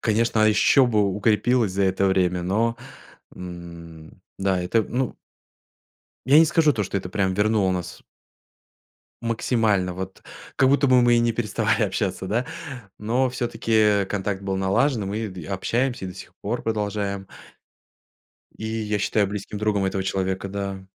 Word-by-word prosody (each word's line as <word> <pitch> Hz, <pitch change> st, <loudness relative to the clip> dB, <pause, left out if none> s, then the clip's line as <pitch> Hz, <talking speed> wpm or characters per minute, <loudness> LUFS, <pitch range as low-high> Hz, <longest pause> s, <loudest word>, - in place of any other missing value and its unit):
конечно, 115 Hz, 0 st, +1 dB
а -, -, +6 dB
еще 125 Hz, +5 st, +4 dB
бы 105 Hz, -4 st, +2 dB
укрепилось 110 Hz, +1 st, +2 dB
за 100 Hz, +1 st, 0 dB
это 95 Hz, +1 st, +1 dB
время, 90 Hz, -2 st, +1 dB
но, 110 Hz, +6 st, 0 dB, 0.6 s
м, 85 Hz, -2 st, -10 dB, 0.2 s
да, 95 Hz, -1 st, +1 dB
это, 90 Hz, +6 st, +1 dB
ну 125 Hz, +4 st, -3 dB, 1.1 s
я 140 Hz, +4 st, +6 dB
не 165 Hz, -, +8 dB
скажу 155 Hz, -1 st, +3 dB
то, 110 Hz, -5 st, -1 dB
что 100 Hz, -, -3 dB
это 95 Hz, -2 st, -3 dB
прямо 95 Hz, -1 st, 0 dB
вернуло 105 Hz, -1 st, +2 dB
нас 90 Hz, -2 st, -5 dB, 1.2 s
максимально, 110 Hz, -5 st, 0 dB
вот 95 Hz, +1 st, -7 dB, 0.4 s
как 130 Hz, -1 st, +4 dB
будто 140 Hz, 0 st, +3 dB
бы 130 Hz, -1 st, +6 dB
мы 120 Hz, 0 st, +4 dB
и 120 Hz, -, +4 dB
не 120 Hz, 0 st, +2 dB
переставали 110 Hz, -2 st, 0 dB
общаться, 95 Hz, -, -2 dB
да, 115 Hz, +6 st, 0 dB, 0.5 s
но 125 Hz, +5 st, 0 dB
всё-таки, 120 Hz, -2 st, -3 dB
э, 105 Hz, -2 st, +4 dB
контакт 100 Hz, -1 st, -3 dB
был 95 Hz, -1 st, -2 dB
налажен, 105 Hz, +4 st, +1 dB
мы 110 Hz, +2 st, -3 dB
д 90 Hz, -4 st, -9 dB
общаемся 115 Hz, +5 st, -1 dB
и -, -, -6 dB
до 90 Hz, -, -8 dB
сих 95 Hz, -, -12 dB
пор 115 Hz, +5 st, -2 dB
продолжаем. 100 Hz, -3 st, -2 dB, 1.3 s
И 110 Hz, -, -5 dB
я 110 Hz, -1 st, -2 dB
считаю 105 Hz, 0 st, +1 dB
близким 105 Hz, +1 st, -5 dB
другом 105 Hz, -2 st, 0 dB
этого 95 Hz, 0 st, -1 dB
человека, 95 Hz, 0 st, -2 dB
да. 100 Hz, -1 st, -5 dB
105 Hz, 155 wpm, -23 LUFS, 95-115 Hz, 1.3 s, не